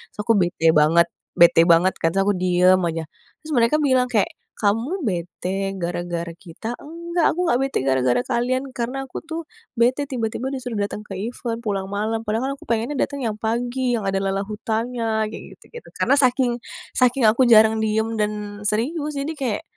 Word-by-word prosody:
terus - - -25
aku 230 - +2
bete 170 -2 +3
banget 160 +2 +4 0.2
bete 170 -1 +6
banget 170 +2 +5
kan, - - +1
terus 195 - +3
aku 205 - +2
diem 180 +1 +4
aja, 165 -1 -3 0.4
terus 310 - -8
mereka 235 0 +3
bilang 260 -3 +3
kayak 215 -5 +1 0.2
"Kamu 230 - 0
bete 190 0 -3
gara-gara 175 -1 -3
kita?" 175 +6 -8
"Enggak 340 +2 -1
aku 360 - 0
enggak 255 -8 +2
bete 270 0 -1
gara-gara 130 - +2
kalian, 255 +1 0
karena 255 +2 -3
aku 265 - -7
tuh 330 +1 -6 0.3
bete 255 +4 +2
tiba-tiba 245 -1 -3
disuruh 255 -5 -4
datang 205 +1 -3
ke 205 - -17 0.2
event 235 -1 -4
pulang 200 -4 -3
malam, 220 +2 -2
padahal 220 +2 -1
kan - - -1
aku - - -16
pengennya 230 +5 -1
datang 285 -1 -4
yang 225 -5 -2
pagi 240 +2 -1
yang 200 - -4
ada 195 - 0
lala 195 0 -1
hutannya," 220 +1 -2
kayak 215 - -8 0.2
gitu-gitu, 475 - -13
karena - - +3
saking 255 -2 +3 0.4
saking 250 -1 +3
aku 230 +4 +4
jarang 220 -2 +5
diem 220 +1 0
dan 210 -1 -3
serius, 285 +9 -1
jadi 305 +3 -3
kayak 255 -8 -2
225 Hz, 180 wpm, -22 LUFS, 195-255 Hz, 0.4 s, bete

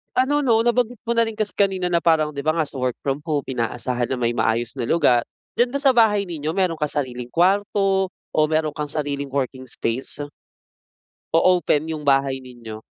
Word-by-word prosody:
Ano, 285 +3 +2
'no, 225 -3 +4
nabanggit 240 -1 0
mo 235 - +1
na 230 - +4
rin 225 - -4
kasi 215 -1 -3
kanina 190 -3 +1
na 175 - +1
parang, 155 -3 +2
'di 140 - -4
ba, 155 - +3
nga 160 -3 -1
sa - - -7
work 125 -1 -1
from 140 +2 -3
home, 150 -4 -2
inaasahan 120 0 -2
na 125 - -2
may 120 0 0
maayos 115 +1 0
na 120 - -2
lugar. 125 -5 +3 0.3
Diyan 245 +1 +2
ba 280 - 0
sa 270 -3 +4
bahay 210 -4 +3
ninyo, 155 -1 -3
meron 185 -3 0
kang 150 -1 -1
sariling 125 -2 -7
kwarto 195 +1 +2
o - - -9
meron 155 -1 0
kang 150 -1 -3
sariling 140 -2 -3
working 130 -1 -2
space? 125 +3 -2 1.1
O 165 - +5
open 170 -4 +2
yung 155 -2 -5
bahay 135 -1 +1
ninyo? 115 -3 -10
155 Hz, 200 wpm, -22 LUFS, 130-195 Hz, 1.1 s, O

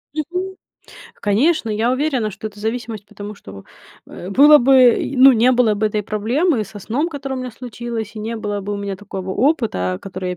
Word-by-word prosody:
Мгм. 360 +5 -4 0.6
Конечно, 230 +4 +1
я 220 +3 0
уверена, 260 -4 0
что 200 +2 -8
это 205 -1 -10
зависимость, 220 -2 -4
потому 205 +1 -9
что, 95 - -12 0.4
э, 180 - -9
было 295 +8 +7
бы, 270 +2 +4
э, 255 +1 +4
ну, 265 +1 +8
не 240 +2 +4
было 240 -4 +3
бы 215 +1 0
этой 210 0 -2
проблемы 225 - 0
со 205 +1 -11
сном, 255 - -2
которая 275 -3 -5
у - - -4
меня 250 - -5
случилась, 230 -2 -6
и 215 - -7
не 225 +2 -4
было 205 -2 -3
бы 205 +1 -5
у - - -3
меня 200 -1 -4
такого 190 -1 -7
опыта, 215 - 0
который 185 -1 -5
я 180 - -4
225 Hz, 205 wpm, -19 LUFS, 205-260 Hz, 0.6 s, ну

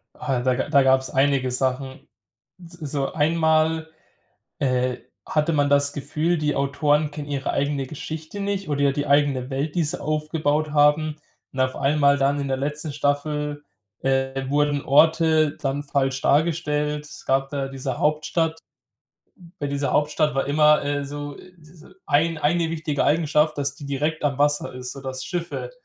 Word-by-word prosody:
Ah, 135 -5 -2
da 130 0 +1
ga 130 - -2
da 140 -2 +5
gab's 130 0 +3
einige 135 -1 +2
Sachen. 130 +1 -2 0.6
S 170 - -13
so 140 -2 -2
einmal, 160 0 +2 0.7
äh, 125 -2 0 0.3
hatte 155 +2 +1
man 145 -2 +2
das 140 0 +3
Gefühl, 155 +4 -1
die 150 -1 0
Autoren 145 +2 +1
kennen 145 -1 -7
ihre 140 -1 -2
eigene 140 -1 -1
Geschichte 160 +6 -7
nicht 200 -3 -2
oder, 145 -1 -1
ja, 140 -1 +3
die 145 +1 -2
eigene 140 -2 +2
Welt, 140 +3 -2
die 170 - +2
sie 165 +4 -3
aufgebaut 155 0 -1
haben. 150 +1 +3 0.4
Und 130 - -4
auf 130 0 +1
einmal 140 0 +3
dann 140 +1 +1
in 140 - -3
der 135 - 0
letzten 150 +2 -3
Staffel, 145 0 -1 0.4
äh, 135 0 0
wurden 145 0 +1
Orte 160 +1 +4
dann 140 +1 -2
falsch 135 -1 0
dargestellt. 150 -1 +1
Es - - -12
gab 135 0 +1
da 140 -2 -3
diese 135 -1 -4
Hauptstadt. 160 +2 0 1.0
Bei 145 - -1
dieser 140 0 -1
Hauptstadt 150 0 +1
war 135 - +1
immer, 150 0 +4
äh, 145 0 -1
so 145 0 -6
s 170 -2 -17
so - - -15 0.2
ein 155 +2 +2
eine 165 +2 +1
wichtige 155 -3 -1
Eigenschaft, 155 0 +2
dass 140 -1 -1
die 145 - -11
direkt 150 +3 -2
am 140 -2 0
Wasser 145 -1 +1
ist, 125 0 -7
so 135 - -9
dass 130 -1 -5
Schiffe 175 - -4
145 Hz, 165 wpm, -23 LUFS, 140-155 Hz, 1.0 s, da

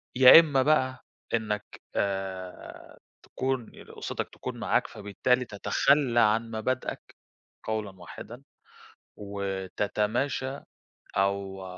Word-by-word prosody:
يا 130 +4 +11
إما 145 -5 +2
بقى 130 -3 +1 0.3
إنك 105 -2 -1 0.3
آآ 95 -2 -4 0.3
تكون 130 -3 -3 0.2
أُسرتك - - -5
تكون - - -6
معاك، - - +1
فبالتالي 125 +5 0
تتخلى 120 +4 +2
عن 115 +2 +2
مبادئك 120 +3 -3 0.5
قولًا 105 -4 -4
واحدًا 120 +8 -10 0.7
وتتماشى، 105 +7 -2 0.6
أو 95 -1 -1
110 Hz, 85 wpm, -28 LUFS, 100-130 Hz, 0.7 s, يا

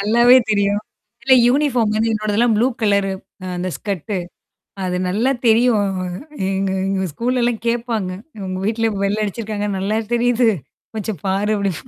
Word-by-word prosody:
நல்லாவே 235 +5 +6
தெரியும். 200 0 +2 0.4
இல்ல 260 +1 +5
யூனிஃபார்ம் 245 -5 +2
வந்து 225 +1 +1
என்னோடதெல்லாம் 215 +2 +1
ப்ளூ 235 +4 +3 0.2
கலரு 200 -2 +2 0.3
அ - - -5
அந்த 180 +1 -2
ஸ்கட்டு. 200 -1 -3 0.7
அது 180 -1 -1
நல்லா 220 +9 +1 0.2
தெரியும் 225 -3 +4 0.6
எங்க 195 0 -1 0.2
எங்க 195 -1 0
ஸ்கூல்லல்லாம் 240 0 0
கேடப்பாங்க. 230 -5 -1 0.3
உங்க 185 0 -4
வீட்ல 225 0 0
வெள்ள 200 +2 0
அடிச்சிருக்காங்க 210 0 -3
நல்லா 200 +3 -1 0.2
தெரியுது. 240 0 +3 0.5
கொஞ்சம் 215 -6 -4
பாரு 200 +3 +1
அப்டி. 200 -2 0
215 Hz, 135 wpm, -19 LUFS, 200-235 Hz, 0.7 s, நல்லாவே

